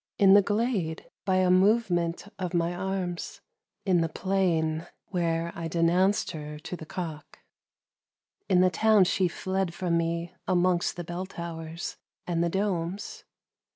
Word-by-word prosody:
m 195 Hz, -2 st, +7 dB
the 205 Hz, -, +8 dB
glade 205 Hz, -6 st, -1 dB
by 190 Hz, -1 st, +2 dB
a 185 Hz, -1 st, +4 dB
movement 185 Hz, -3 st, +2 dB
of 180 Hz, -2 st, -3 dB
mj 170 Hz, 0 st, +1 dB
arms; 185 Hz, -2 st, -3 dB, 0.5 s
in 180 Hz, -3 st, +3 dB
the 165 Hz, -, 0 dB
plain, 165 Hz, -3 st, 0 dB, 0.2 s
where 170 Hz, -2 st, 0 dB
I 165 Hz, -1 st, -4 dB
denounced 175 Hz, +5 st, +2 dB
to 150 Hz, -2 st, -6 dB
the 160 Hz, 0 st, -7 dB
cock. 160 Hz, -4 st, -6 dB, 1.1 s
In 180 Hz, -1 st, +5 dB
the 185 Hz, 0 st, +4 dB
town 215 Hz, 0 st, +5 dB
she 185 Hz, 0 st, +2 dB
tied 190 Hz, 0 st, -2 dB
from 175 Hz, -2 st, 0 dB
me 170 Hz, +1 st, -2 dB
amongst 180 Hz, -1 st, +2 dB
the 175 Hz, -, -5 dB
bell 175 Hz, +2 st, -5 dB
towers 165 Hz, -2 st, -6 dB, 0.3 s
and 170 Hz, -1 st, 0 dB
the 170 Hz, -, +1 dB
domes. 190 Hz, 0 st, -2 dB
175 Hz, 140 wpm, -28 LUFS, 165-190 Hz, 1.1 s, the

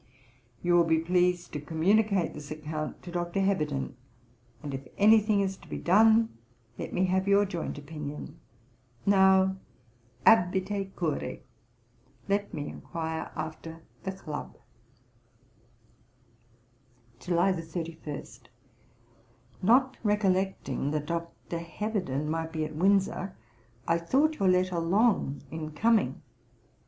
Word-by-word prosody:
You 175 Hz, 0 st, +2 dB
will 175 Hz, 0 st, +6 dB
be 165 Hz, -1 st, +3 dB
pleased 180 Hz, +1 st, +1 dB
to 150 Hz, -, -3 dB
communicate 190 Hz, +4 st, +2 dB
this 150 Hz, -1 st, -9 dB
account 155 Hz, 0 st, -5 dB
to 175 Hz, -, -8 dB
Dr. 175 Hz, +1 st, -2 dB
Heberden, 150 Hz, -10 st, 0 dB, 0.7 s
and 145 Hz, -2 st, -5 dB
if 135 Hz, -1 st, -6 dB
any 215 Hz, +2 st, +7 dB
thing 210 Hz, -1 st, +1 dB
is 195 Hz, -1 st, -1 dB
to -, -, -17 dB
be -, -, -4 dB
done, 220 Hz, +4 st, +4 dB, 0.4 s
let -, -, -5 dB
me 185 Hz, -, +1 dB
have 190 Hz, +1 st, +1 dB
your 200 Hz, +1 st, +5 dB
joint 175 Hz, -5 st, -4 dB
opinion. 150 Hz, 0 st, -7 dB, 0.7 s
Now 190 Hz, -1 st, +5 dB, 0.7 s
abite 195 Hz, -1 st, +3 dB
curoe; 155 Hz, -6 st, -2 dB, 0.9 s
let 200 Hz, +1 st, 0 dB
me 145 Hz, -, -4 dB
enquire 160 Hz, -1 st, -5 dB
after 160 Hz, +1 st, -6 dB, 0.2 s
the 190 Hz, -, -3 dB
Club.' 155 Hz, -6 st, -7 dB, 2.6 s
July 175 Hz, +3 st, +2 dB
31. 165 Hz, -3 st, -5 dB, 1.4 s
'Not 255 Hz, +6 st, +4 dB
recollecting 190 Hz, -, 0 dB
that 150 Hz, 0 st, -2 dB
Dr. 170 Hz, +1 st, -4 dB
Heberden 170 Hz, -4 st, -3 dB
might 160 Hz, +1 st, -2 dB
be 155 Hz, -1 st, -2 dB
at 155 Hz, -, -7 dB
Windsor, 195 Hz, +1 st, +1 dB, 0.5 s
I 165 Hz, 0 st, +3 dB
thought 280 Hz, -, +1 dB
your 195 Hz, -2 st, +3 dB
letter 180 Hz, -1 st, +2 dB
long 175 Hz, -, +2 dB
in 155 Hz, -1 st, -5 dB
coming. 225 Hz, +7 st, +2 dB
175 Hz, 115 wpm, -29 LUFS, 160-195 Hz, 2.6 s, any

